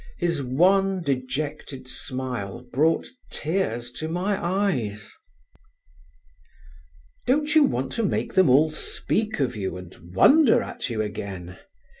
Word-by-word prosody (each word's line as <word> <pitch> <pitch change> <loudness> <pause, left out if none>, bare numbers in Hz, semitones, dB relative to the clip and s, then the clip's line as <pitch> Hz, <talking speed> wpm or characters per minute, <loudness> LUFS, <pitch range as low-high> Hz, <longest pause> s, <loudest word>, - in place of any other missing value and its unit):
His 170 -4 0
wan 185 +8 +2
dejected 135 -1 -3
smile 125 -3 -5
brought 160 +5 +2 0.2
tears 145 -8 -2
to 155 +5 -4
my 185 +4 -1
eyes. 130 - -1 2.2
"Don't 295 +4 +2
you 310 -2 +7
want 130 - -1
to 230 - -1
make 200 - -1
them 185 -5 +5
all 150 +5 +5
speak 215 +6 -1
of 125 -3 0
you 95 -3 -3
and 90 -1 -10 0.2
wonder 280 - +6
at - - -5
you 110 -2 -1
again? 95 -3 -6
140 Hz, 120 wpm, -25 LUFS, 120-190 Hz, 2.2 s, you